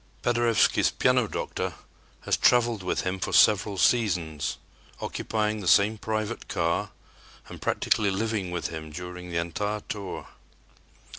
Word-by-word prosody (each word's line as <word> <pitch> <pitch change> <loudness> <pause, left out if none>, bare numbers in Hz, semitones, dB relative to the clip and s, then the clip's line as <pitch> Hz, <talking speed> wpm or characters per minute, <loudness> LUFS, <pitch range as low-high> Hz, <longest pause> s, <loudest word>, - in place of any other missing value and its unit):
Paderewski's 120 -1 +3
"piano - - +2
doctor" - - -4 0.5
has - - +1
traveled 120 -3 +3
with 90 - -1
him 95 +1 -2
for - - -3
several 105 -1 +4
seasons, 90 - +1 0.4
occupying 110 -1 -2
the 95 - -5
same 105 +3 +4
private 110 -1 -3
car 85 0 0 0.6
and - - -10
practically 105 -2 +1
living 100 -1 -1
with 90 -1 -3
him 80 -1 -7
during 90 +2 -7
the 85 - -3
entire 105 +6 -2
tour. 100 -3 -6
100 Hz, 130 wpm, -27 LUFS, 90-110 Hz, 0.6 s, several